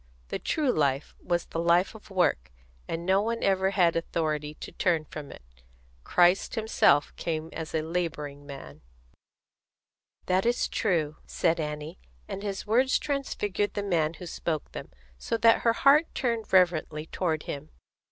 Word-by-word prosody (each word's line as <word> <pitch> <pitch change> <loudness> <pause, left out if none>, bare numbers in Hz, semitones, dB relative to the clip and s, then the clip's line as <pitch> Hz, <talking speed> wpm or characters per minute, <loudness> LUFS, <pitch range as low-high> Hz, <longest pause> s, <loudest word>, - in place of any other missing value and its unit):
The - - -3
true 300 -5 +1
life 140 - 0
was 175 -1 -1
the 165 - -5
life 170 +4 +3
of 220 -1 -14
work, 175 - +1 0.4
and 165 +1 -4
no 190 +2 +3
one 230 +2 -2
ever 190 -1 +2
had 180 -4 +3
authority 155 -3 -2
to - - -9
turn 165 -4 +1
from 150 -1 -8
it. - - -12 0.6
Christ 180 +4 +3
Himself 215 -10 +3
came 160 -1 -3
as 160 -1 -5
a 155 - 0
labouring 155 -4 -3
man." 75 - -10 1.4
"That 185 +1 +2
is 240 +1 +1
true," 155 -5 0
said 165 -1 +1
Annie; 150 - -5 0.3
and 195 - -5
his 200 -2 -4
words 250 +5 +3
transfigured 210 -8 -2
the 205 - -1
man 165 -5 +1
who 180 - -9
spoke 160 -2 -3
them, - - -8 0.3
so 230 - -1
that 230 0 +5
her 230 - +3
heart 285 +6 +5
turned 230 -4 -1
reverently 170 -4 +2
toward 160 -2 -2
him. 140 - -6
175 Hz, 155 wpm, -28 LUFS, 155-205 Hz, 1.4 s, that